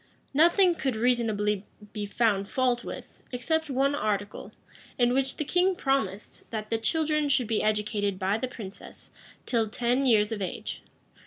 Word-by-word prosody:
Nothing 345 +5 +5
could 270 -7 -2
reasonably 220 -4 +1 0.3
be 210 -1 -4
found 200 -2 +1
fault 250 -2 +1
with, - - -9
except 315 +5 -1
one 275 +1 +2
article, 205 -8 -2 0.5
in 245 0 +3
which 265 0 0
the 300 - -2
king 360 +4 +2
promised, 270 - -2
that 215 -1 -5
the 225 - +1
children 305 +4 +1
should 260 -3 +3
be 220 -1 0
educated 210 -2 0
by 195 +3 0
the 255 - -2
princess, 205 -6 -10 0.3
till 225 -3 +1
ten 245 +4 0
years 220 -4 +4
of 215 -2 -3
age. 185 - -4
240 Hz, 155 wpm, -27 LUFS, 210-275 Hz, 0.5 s, Nothing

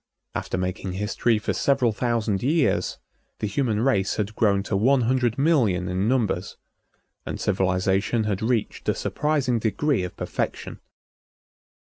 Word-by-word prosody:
After - - -3
making 90 +1 -3
history 105 +4 +1
for 105 - -2
several 135 -4 +2
thousand 110 -3 -1
years, 150 +4 +1 0.4
the - - -3
human 110 0 0
race 105 -6 +1
had 105 0 -3
grown 100 -3 +2
to 100 - -2
one 125 +6 +3
hundred 120 -1 +1
million 120 - +2
in 95 +3 0
numbers, 120 -4 0 0.7
and - - -5
civilization 95 +3 +1
had 105 -3 -2
reached 115 -1 -1
a - - +2
surprising 145 -6 0
degree 120 +3 0
of 90 - -6
perfection. - - -4
110 Hz, 135 wpm, -24 LUFS, 100-125 Hz, 0.7 s, one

